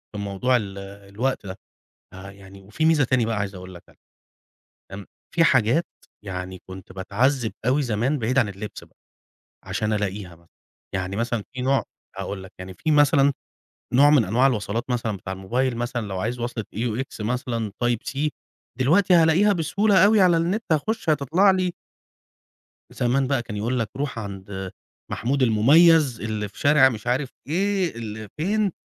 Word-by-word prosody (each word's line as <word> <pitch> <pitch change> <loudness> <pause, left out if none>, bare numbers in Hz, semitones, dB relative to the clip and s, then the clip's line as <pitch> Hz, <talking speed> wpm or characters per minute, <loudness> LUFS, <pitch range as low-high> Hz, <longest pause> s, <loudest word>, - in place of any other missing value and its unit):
في - - -4
موضوع 100 +6 0
ال 100 -3 -6
الوقت 100 +5 -4
ده. 95 +1 -7 0.5
آه، 95 +1 -10
يعني، 95 0 -14
وفي 110 +11 -3
ميزة 160 -4 +4
تاني 125 -1 +1
بقى 115 - -1
عايز 100 -1 -3
أقول 90 0 -10
لك 85 - -12
عليها. - - -23 0.9
امم، 100 0 -8 0.3
في 165 -1 +4
حاجات 130 +4 +3 0.4
يعني 95 -1 -6
كنت 95 0 -10
باتعذب 110 +6 0
أوي 140 +3 +2
زمان، 120 +5 0
بعيد 125 +2 0
عن 115 -6 +3
اللبس 100 +2 -8
بقى، - - -27 0.7
عشان 105 +3 -2
ألاقيها 100 -4 -3
مثلًا. 85 +1 -24 0.5
يعني 95 0 -3
مثلًا 115 0 -2
في 125 - -5
نوع، 135 +1 +2 0.3
هأقول 95 -2 -5
لك، 95 - -12
يعني 95 0 -8
في 155 - -2
مثلًا 145 -1 +4 0.6
نوع 140 +4 +6
من 140 -7 +5
أنواع 125 +8 +3
الوصلات 110 -1 -1
مثلًا 115 -5 -1
بتاع 95 +1 -6
الموبايل، 120 +6 -1
مثلًا 120 -2 -3
لو 95 -1 -4
عايز 120 +5 -3
وصلة 120 -2 -3
AUX 115 +2 -3
مثلًا 115 -1 -2
Type 120 -2 0
C، 150 +3 0 0.5
دلوقتي 180 +8 +4
هلاقيها 170 +5 +5
بسهولة 190 +3 +2
أوي 210 0 +5
على 175 -3 +5
النت، 185 +7 0
هاخش 165 +5 0
هتطلع 155 +7 +3
لي. 185 -1 0 1.2
زمان 130 +2 0
بقى 135 -2 0
كان 105 -3 -7
يقول 120 +5 -1
لك: 115 -3 -2
"روح 140 -4 -3
عند 95 -2 -7 0.4
محمود 135 +4 -1
المميز 140 +4 +5
اللي 110 -2 -3
في - - -18
شارع 145 -2 +5
مش 115 -2 -7
عارف 130 +2 0 0.2
إيه، 190 - 0
اللي 110 -2 -7
فين، 200 +4 0
120 Hz, 165 wpm, -23 LUFS, 100-145 Hz, 1.2 s, نوع